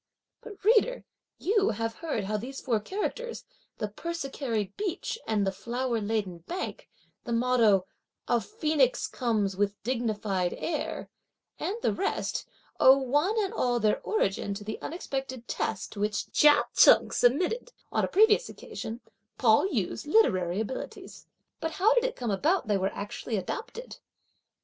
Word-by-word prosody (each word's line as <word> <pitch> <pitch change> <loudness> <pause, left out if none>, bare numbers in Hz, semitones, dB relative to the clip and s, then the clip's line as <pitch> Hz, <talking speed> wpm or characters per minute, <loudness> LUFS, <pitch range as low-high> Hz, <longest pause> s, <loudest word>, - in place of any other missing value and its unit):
But, 415 -5 -11
reader, 470 +3 +3 0.3
you 405 +1 +2
have 225 +1 -2
heard 310 -10 -2
how 200 +2 -3
that 210 - 0
these 265 +3 -6
four 230 -4 0
characters 425 - -4 0.3
"the 215 - -2
persicary 265 - -3
beach 410 +3 -3
and 210 -2 +1
the 195 - +1
flower 235 +3 -2
laden 205 -5 -2
bank," 350 - -6 0.3
the 240 - -6
motto 230 -5 +3 0.4
"a 240 -1 +2
phoenix 305 - +1
comes 215 -6 -1
with 200 +1 0
dignified 215 -6 -1
air," 305 -3 -3 0.5
and 395 - -2
the - - +2
rest 390 - -2 0.3
owe 265 +1 +8
one 290 - +1
and 395 +2 -3
all 245 - +1
their 215 -2 +2
origin 200 - -1
to 205 - -7
the 215 +1 -6
unexpected 270 -7 -5
test 210 - -3
to 205 - -8
which 210 +1 -1
Chia 295 -1 +6
Cheng - - +7
submitted, 360 - +1 0.2
on - - +1
a - - +2
previous 440 +4 +4
occasion, 230 +2 -7 0.4
Pao 230 +7 +4
yü's 235 - -2
literary 190 - +3
abilities; 225 +4 -6 0.3
but 320 0 -3
how 415 +5 +4
did - - +3
it - - -2
come 240 -3 -2
about 310 - +2
that 210 - 0
they - - +3
were 190 +1 +1
actually 210 +2 -4
adopted? 460 - -6
245 Hz, 155 wpm, -28 LUFS, 210-350 Hz, 0.5 s, owe